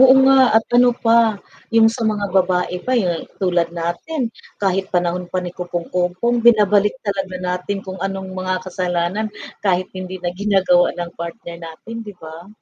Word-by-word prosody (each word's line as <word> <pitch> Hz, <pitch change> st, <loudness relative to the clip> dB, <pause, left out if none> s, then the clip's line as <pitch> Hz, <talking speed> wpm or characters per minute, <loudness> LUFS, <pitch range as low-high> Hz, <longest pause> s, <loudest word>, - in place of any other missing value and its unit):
Oo 260 Hz, 0 st, +9 dB
nga 270 Hz, 0 st, +6 dB, 0.2 s
at 225 Hz, -, +3 dB
ano 245 Hz, 0 st, +5 dB
pa, 230 Hz, -2 st, +4 dB, 0.3 s
yung 225 Hz, 0 st, +4 dB
sa 240 Hz, -, -7 dB
mga 205 Hz, -3 st, -2 dB
babae 180 Hz, -1 st, +1 dB
pa 255 Hz, +4 st, 0 dB
yung 175 Hz, -7 st, -1 dB
tulad 175 Hz, -3 st, +1 dB
natin 225 Hz, -, -3 dB, 0.2 s
kahit 195 Hz, -1 st, 0 dB
panahon 180 Hz, 0 st, -1 dB
pa -, -, -4 dB
ni 175 Hz, -, -5 dB
kopong-kopong, 180 Hz, +6 st, -1 dB
binabalik 210 Hz, -2 st, +4 dB
talaga 195 Hz, -2 st, -2 dB
natin 180 Hz, +2 st, -3 dB
kung 190 Hz, 0 st, -7 dB
anong 195 Hz, -1 st, -4 dB
mga 185 Hz, 0 st, -2 dB
kasalanan 180 Hz, +3 st, -1 dB, 0.3 s
kahit 185 Hz, -2 st, +1 dB
hindi 185 Hz, 0 st, -6 dB
na 175 Hz, -, -1 dB
ginagawa 190 Hz, -3 st, +2 dB
ng 175 Hz, -1 st, -4 dB
partner 170 Hz, +1 st, -7 dB
natin, 170 Hz, +8 st, -8 dB
'di 205 Hz, -3 st, -9 dB
ba? 165 Hz, +3 st, -11 dB
185 Hz, 160 wpm, -20 LUFS, 180-215 Hz, 0.3 s, Oo